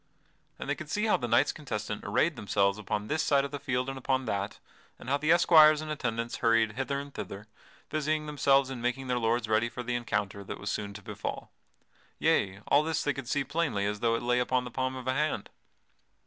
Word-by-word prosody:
And -, -, -7 dB
they -, -, +1 dB
could 155 Hz, -, -8 dB
see 210 Hz, +7 st, 0 dB
how 220 Hz, -, +3 dB
the 120 Hz, -, -3 dB
knights 120 Hz, +5 st, +3 dB
contestant 105 Hz, -8 st, -5 dB
arrayed 155 Hz, +10 st, +1 dB
themselves 100 Hz, -2 st, +1 dB
upon 105 Hz, 0 st, -3 dB
this 155 Hz, +5 st, 0 dB
side 140 Hz, -1 st, +3 dB
of 140 Hz, -, -6 dB
the 145 Hz, -, -4 dB
field 130 Hz, -2 st, -1 dB
and 135 Hz, 0 st, -4 dB
upon 130 Hz, 0 st, 0 dB
that, 100 Hz, -2 st, -2 dB, 0.4 s
and -, -, -12 dB
how 140 Hz, -, +3 dB
the 155 Hz, +2 st, +1 dB
esquires 155 Hz, -3 st, +7 dB
and 155 Hz, 0 st, -5 dB
attendants 115 Hz, -5 st, -2 dB
hurried 115 Hz, -1 st, +3 dB
hither 135 Hz, +4 st, -2 dB
and 140 Hz, 0 st, -8 dB
thither, 100 Hz, +2 st, -7 dB, 0.5 s
busying 155 Hz, 0 st, 0 dB
themselves 140 Hz, -2 st, +3 dB
in 125 Hz, -3 st, -5 dB
making 125 Hz, +2 st, -2 dB
their 125 Hz, -1 st, +1 dB
lords 115 Hz, 0 st, +1 dB
ready 110 Hz, +2 st, +2 dB
for 125 Hz, -, -6 dB
the 120 Hz, 0 st, -2 dB
encounter 105 Hz, -4 st, -2 dB
that -, -, -7 dB
was 105 Hz, +1 st, -3 dB
soon 100 Hz, -2 st, -4 dB
to 100 Hz, -, -9 dB
befall. -, -, -6 dB, 0.7 s
Yea, 95 Hz, +1 st, +1 dB
all 140 Hz, -, +5 dB
this 160 Hz, 0 st, -1 dB
could 145 Hz, -, 0 dB
they 135 Hz, -, -5 dB
see 140 Hz, +4 st, 0 dB
as 135 Hz, -, -5 dB
plainly 145 Hz, -10 st, 0 dB
as 105 Hz, 0 st, -2 dB
though 115 Hz, 0 st, +2 dB
it 115 Hz, -, -3 dB
lay 125 Hz, 0 st, +2 dB
upon 125 Hz, 0 st, +1 dB
the 125 Hz, -, -7 dB
palm 130 Hz, +1 st, -2 dB
of 130 Hz, -1 st, -7 dB
a 130 Hz, -, +2 dB
hand. 150 Hz, +2 st, -1 dB
125 Hz, 230 wpm, -29 LUFS, 110-145 Hz, 0.7 s, esquires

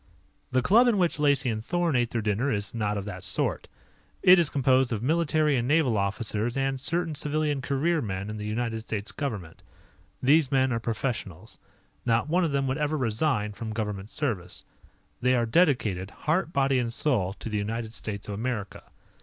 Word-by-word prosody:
The 130 Hz, -1 st, +2 dB
club 230 Hz, -, +5 dB
in 230 Hz, -4 st, +3 dB
which 175 Hz, -4 st, +1 dB
Lacey 145 Hz, -2 st, +2 dB
and 110 Hz, 0 st, -4 dB
Thorn 175 Hz, +1 st, 0 dB
ate 120 Hz, -2 st, +2 dB
their 115 Hz, -2 st, -2 dB
dinner 110 Hz, +7 st, 0 dB
is 100 Hz, -1 st, -3 dB
not 105 Hz, -3 st, -1 dB
of 100 Hz, -, -4 dB
that 105 Hz, -, -7 dB
sort. -, -, -1 dB, 0.6 s
It 180 Hz, 0 st, +8 dB
is 165 Hz, -4 st, +2 dB
composed 130 Hz, -2 st, +2 dB
of 110 Hz, -1 st, -2 dB
military 155 Hz, 0 st, +2 dB
and 120 Hz, -1 st, 0 dB
naval 145 Hz, -5 st, +3 dB
officers 105 Hz, +4 st, -1 dB
and 135 Hz, -1 st, 0 dB
certain 170 Hz, +3 st, -1 dB
civilian 150 Hz, -1 st, -1 dB
career 145 Hz, +5 st, 0 dB
men 100 Hz, -2 st, -4 dB
in 110 Hz, -, -6 dB
the 105 Hz, 0 st, -5 dB
United 110 Hz, +1 st, -2 dB
States 110 Hz, +1 st, -4 dB
Government. 105 Hz, -, -5 dB, 0.6 s
These 140 Hz, +1 st, +4 dB
men 130 Hz, -1 st, +3 dB
are 115 Hz, -, 0 dB
professionals. 110 Hz, -, -4 dB, 0.4 s
Not 115 Hz, +2 st, +1 dB
one 175 Hz, +4 st, +2 dB
of 165 Hz, -, 0 dB
them 140 Hz, -1 st, 0 dB
would 135 Hz, +2 st, -1 dB
ever 150 Hz, +1 st, 0 dB
resign 115 Hz, -3 st, 0 dB
from 110 Hz, +2 st, -6 dB
government 105 Hz, -2 st, -4 dB
service. 105 Hz, -, -4 dB, 0.6 s
They 125 Hz, +1 st, +3 dB
are 120 Hz, -1 st, +2 dB
dedicated, 115 Hz, -, +2 dB
heart, 160 Hz, -, -1 dB
body, 135 Hz, -3 st, +2 dB
and 120 Hz, -2 st, -1 dB
soul 115 Hz, -8 st, 0 dB
to 105 Hz, -, -9 dB
the 105 Hz, -2 st, -1 dB
United 110 Hz, +2 st, -3 dB
States 100 Hz, -3 st, -6 dB
of 105 Hz, -, -4 dB
America. 110 Hz, -1 st, -4 dB
125 Hz, 185 wpm, -27 LUFS, 105-145 Hz, 0.6 s, It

